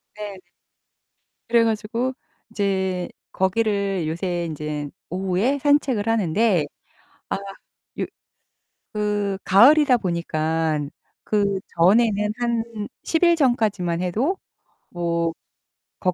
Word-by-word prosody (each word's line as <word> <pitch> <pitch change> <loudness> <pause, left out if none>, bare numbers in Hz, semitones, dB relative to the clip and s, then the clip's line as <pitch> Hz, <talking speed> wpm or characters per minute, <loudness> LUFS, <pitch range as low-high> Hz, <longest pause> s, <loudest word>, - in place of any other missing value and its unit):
네. 205 -3 -7 1.1
그래 235 -1 +5
가지고 230 +3 -1 0.4
이제 190 -4 -1 0.2
거기를 195 -2 0
요새 175 +2 -2
인제 150 -2 -4 0.2
오후에 190 - 0
산책을 275 -6 +2
하는데 205 -4 +2 0.7
아 - - +1 0.6
요 - - 0 0.9
그 205 -2 -1
가을이다 260 +7 +6
보니까 160 -4 -1 0.4
그 200 -2 +1 0.2
전에는 210 +3 +4
한 235 -2 0 0.4
10 325 +1 0
일 345 -1 +6
전까지만 210 - +1
해도 240 - 0 0.5
뭐 170 -1 -1 0.7
거 185 -1 +1
200 Hz, 180 characters per minute, -23 LUFS, 175-230 Hz, 1.1 s, 가을이다